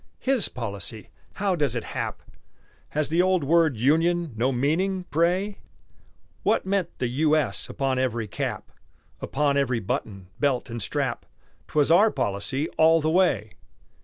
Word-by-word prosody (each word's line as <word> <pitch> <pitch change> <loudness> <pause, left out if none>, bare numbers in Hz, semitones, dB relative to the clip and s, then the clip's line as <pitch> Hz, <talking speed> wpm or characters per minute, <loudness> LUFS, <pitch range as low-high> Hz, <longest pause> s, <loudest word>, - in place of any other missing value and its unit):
"His 260 -6 +1
policy" 110 -2 -5 0.2
how 195 -2 0
does 145 -7 0
it 120 - -2
hap? - - -5 0.7
Has 150 -1 0
the 165 +3 +3
old 185 -3 +2
word 160 -3 +3
"Union" 165 +5 +2
no 125 +4 +1
meaning, 175 +9 0
pray? 180 +6 +1 0.8
What - - +1
meant 190 -3 -1
the 125 - -1
"U. 150 +5 +2
S." 155 - -1
upon 135 -2 -1
every 120 -4 -1
cap - - -4 0.5
Upon 140 0 0
every 130 -4 +1
button, 100 -2 -4
belt, 135 -4 0
and 115 0 -4
strap? - - -2 0.4
'Twas 150 +1 +2
our 200 +6 +6
policy 130 - -2
all 160 +1 +6
the 155 0 0
way. 135 - +2
150 Hz, 145 wpm, -25 LUFS, 120-175 Hz, 0.8 s, our